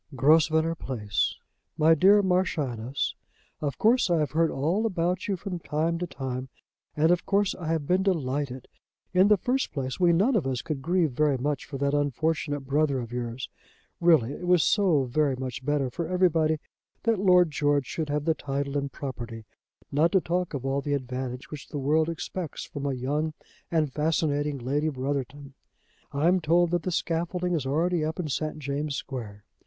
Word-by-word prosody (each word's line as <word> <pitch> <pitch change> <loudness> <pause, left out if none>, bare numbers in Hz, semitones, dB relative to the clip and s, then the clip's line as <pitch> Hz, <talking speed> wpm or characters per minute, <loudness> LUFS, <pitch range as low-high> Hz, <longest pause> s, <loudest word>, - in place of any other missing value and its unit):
"GROSVENOR 160 +3 +4
PLACE. 105 - -2 0.4
"MY 160 +1 +6
DEAR 195 +5 +5
MARCHIONESS, 140 - 0 0.5
Of 145 -3 -2
course 230 -1 +3
I 170 - +3
have 150 -2 0
heard 165 +1 +2
all 175 +11 0
about 180 -2 -1
you 195 -2 -1
from 180 -1 -5
time 165 +2 -1
to 180 - -2
time, 130 -3 -5 0.5
and 160 +3 +4
of 175 -1 +2
course 200 -1 +2
I 165 - -7
have 160 -2 0
been 180 +5 +2
delighted. 140 -8 -1 0.5
In 185 +2 +5
the 210 0 +5
first 255 +8 -1
place, 130 +1 -4
we 175 -2 +5
none 205 +10 +3
of 170 -11 +1
us 130 -2 -2
could 155 -4 -4
grieve 170 0 +1
very 145 +1 +2
much 140 +1 -2
for 140 - -6
that 140 +1 0
unfortunate 145 +1 0
brother 140 0 +1
of 120 -1 -6
yours. 120 0 -4 0.5
Really 155 -7 +4
it 180 - -6
was 180 -3 +5
so 180 -9 +3
very 135 +2 +1
much 130 0 -5
better 140 -2 0
for 170 +4 -3
everybody 165 -3 +2 0.5
that 230 -4 +2
Lord 180 -4 +5
George 145 -2 +1
should 155 +3 -4
have 145 0 -1
the 165 - +3
title 140 -1 -2
and 140 0 -4
property, 120 -5 -6 0.5
not 155 +4 +3
to 190 - +6
talk 175 -1 -2
of 135 -1 -5
all 135 +1 0
the 145 +1 -1
advantage 130 -1 -5
which 150 -2 -8
the 150 - -5
world 155 +4 +2
expects 170 0 -5
from 140 0 -5
a 140 - 0
young 150 +5 -2 0.3
and 155 -5 0
fascinating 150 -2 0
Lady 140 +5 0
Brotherton. 140 0 -4 0.6
I 145 +4 +1
am 185 +1 +4
told 170 +1 +3
that 175 -1 +1
the 185 - -3
scaffolding 175 +2 -1
is 150 -6 -1
already 165 +4 +1
up 160 +3 -3
in 160 -4 -2
St. 155 +2 -2
James' 145 0 -3
Square. 110 -8 -6
150 Hz, 185 wpm, -27 LUFS, 135-170 Hz, 0.6 s, MY